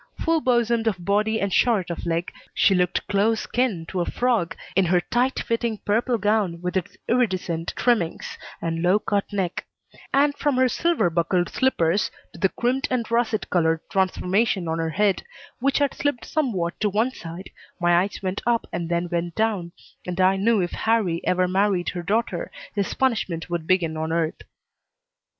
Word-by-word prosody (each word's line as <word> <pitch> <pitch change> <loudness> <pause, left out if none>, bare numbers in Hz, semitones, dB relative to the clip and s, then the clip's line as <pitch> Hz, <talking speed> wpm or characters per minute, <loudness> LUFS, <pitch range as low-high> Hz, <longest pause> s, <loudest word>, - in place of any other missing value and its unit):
Full 330 -1 +2
bosomed 235 -3 +2
of 190 -5 -1
body 210 +3 +2
and 200 -1 -1
short 210 -8 +2
of 170 - -5
leg, 170 +1 -1 0.2
she 195 - +4
looked 180 -1 +1
close 210 +2 +1
kin 230 -10 0
to 185 - -1
a - - 0
frog 235 -9 0 0.2
in 190 0 +4
her 180 +1 +3
tight 245 +8 0
fitting 230 -1 -1
purple 235 +4 +1
gown 205 -4 +1
with 180 +1 -4
its 185 -3 -2
iridescent 185 -8 0
trimmings, 215 -10 0 0.2
and 165 0 -1
low 180 +3 +4
cut 205 -1 -1
neck; 190 -3 -2 0.5
and 285 +1 +3
from 290 -2 0
her 260 0 +4
silver 255 - +1
buckled 175 +1 +1
slippers 195 -7 +1 0.2
to - - -12
the 190 - +3
crimped 255 +6 0
and 235 -3 -1
russet 230 -2 +1
colored 165 -2 +2
transformation 190 0 +1
on 160 0 -1
her 165 0 -1
head, 200 +3 +1 0.4
which 275 +2 +2
had 285 -2 +1
slipped 290 -4 -2
somewhat 200 - -1
to 210 - +1
one 220 +6 +1
side, 170 -4 -9 0.3
my 175 -1 +3
eyes 200 +2 -4
went 190 +1 -2
up 235 -1 +2
and 170 0 -3
then 170 0 0
went 170 0 -2
down, 210 -6 0 0.4
and 180 0 -4
I 185 +1 +5
knew 210 +2 +2
if 175 - -3
Harrie 215 -7 +1
ever 180 0 +2
married 190 -1 +1
her 175 - -4
daughter 225 - -1 0.2
his 200 -2 -1
punishment 190 -10 -1
would 170 -2 -2
begin 170 -4 +2
on 160 +1 -2
earth. 165 -1 -1
195 Hz, 175 wpm, -24 LUFS, 175-230 Hz, 0.5 s, I